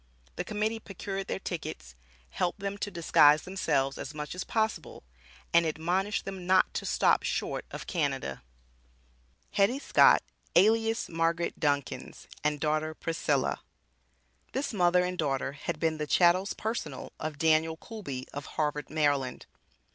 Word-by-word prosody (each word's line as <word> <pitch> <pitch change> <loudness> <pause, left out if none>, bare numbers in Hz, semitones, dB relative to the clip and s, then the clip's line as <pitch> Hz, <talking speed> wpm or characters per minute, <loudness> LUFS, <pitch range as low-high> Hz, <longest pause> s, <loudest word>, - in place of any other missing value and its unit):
The - - -2
Committee 215 +1 -1
procured 195 -1 -5
their - - -2
tickets, 65 - -6 0.4
helped 175 - -1
them 200 +1 -4
to 205 - -2
disguise 155 -4 +5
themselves 140 -8 0
as 150 - -6
much 150 -1 -5
as 180 - -4
possible, 220 -1 -2 0.5
and 170 0 +6
admonished 175 +6 -1
them 190 -2 -6
not 185 0 +4
to - - -3
stop - - +3
short - - -2
of - - -7
Canada. 70 0 -2 1.1
HETTY 205 +6 +3
SCOTT 285 - +5 0.3
ALIAS 225 +4 +4
MARGARET 165 +1 -1
DUNCANS 145 -2 -2 0.2
AND 150 -1 +1
DAUGHTER 155 +1 0
PRISCILLA. 165 +1 0 0.9
This 270 -1 -2
mother 180 -2 +4
and 180 0 -4
daughter 135 -3 0
had 145 +1 -5
been 160 -1 0
the 150 - -2
"chattels 180 +5 +4
personal" 210 - -4
of 155 -1 -4
Daniel 160 +1 +3
Coolby 150 - -7
of 145 0 -6
Harvard, 150 -1 -1
Md. 145 -4 0
165 Hz, 140 wpm, -29 LUFS, 150-195 Hz, 1.1 s, and